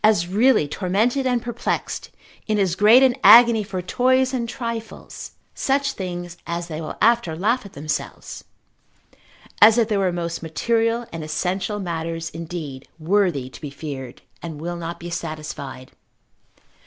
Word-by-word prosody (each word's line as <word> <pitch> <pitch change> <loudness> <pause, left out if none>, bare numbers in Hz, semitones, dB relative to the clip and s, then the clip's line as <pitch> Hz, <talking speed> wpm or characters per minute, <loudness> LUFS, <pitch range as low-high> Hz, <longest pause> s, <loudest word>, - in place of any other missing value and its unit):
As 210 -5 +4
really 215 - +3
tormented 215 - 0
and 245 -2 0
perplexed, 240 -1 -3 0.4
in 215 -1 +1
as 190 -4 +1
great 215 +7 +6
an 255 -2 +4
agony 230 +1 +8
for 190 -2 -5
toys 255 +6 +2
and 235 -3 -2
trifles 230 -2 -6 0.2
(such 275 0 0
things 175 -4 -6
as 170 0 -4
they 155 0 -5
will 155 - -6
after 230 -7 +3
laugh 210 +6 0
at - - -18
themselves) 150 +2 -5 1.2
as 220 +2 +8
if 230 -2 +2
they 210 - +1
were 190 -2 +1
most 170 -1 -4
material 230 +8 0
and 165 -1 -5
essential 185 +6 -2
matters 165 -2 -4
indeed, 160 -5 -7
worthy 170 -5 +1
to - - -12
be 150 - -5
feared, 140 -3 -8 0.2
and 160 -3 -7
will 175 +2 -4
not 170 0 -6
be 175 +1 -7
satisfied. 150 -6 -6
185 Hz, 150 wpm, -22 LUFS, 165-230 Hz, 1.2 s, agony